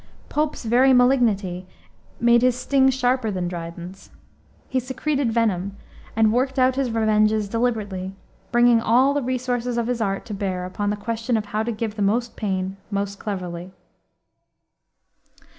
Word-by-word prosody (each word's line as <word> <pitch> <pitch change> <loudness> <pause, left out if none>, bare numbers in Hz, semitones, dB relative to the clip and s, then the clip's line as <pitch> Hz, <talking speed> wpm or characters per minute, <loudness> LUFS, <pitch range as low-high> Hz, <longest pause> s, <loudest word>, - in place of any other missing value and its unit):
Pope's 300 -4 -1
very 255 +4 +5
malignity 220 -8 +2 0.5
made 235 0 +5
his 250 -1 +3
sting 265 +1 +3
sharper 255 -2 +1
than 185 -3 -2
Dryden's. 175 +2 -8 0.6
He 260 - 0
secreted 260 0 -1
venom, 200 -4 0 0.4
and 220 -1 +3
worked 260 +3 0
out 255 0 +3
his 270 -2 0
revenges 215 -1 +2
deliberately, 205 -5 -2 0.4
bringing 240 -1 +5
all 255 +5 +4
the 290 - 0
resources 245 -1 -2
of 235 - 0
his 240 -1 -2
art 195 -2 -1
to 215 - -6
bear 190 -3 -3
upon 205 +3 -3
the 210 - 0
question 230 +2 -2
of 215 - -3
how 210 +1 -2
to 230 +2 -2
give 220 -1 -4
the - - -2
most 230 +4 0
pain 190 -2 -2
most 200 -1 -3
cleverly. 180 -3 -5
225 Hz, 150 wpm, -23 LUFS, 200-250 Hz, 0.6 s, very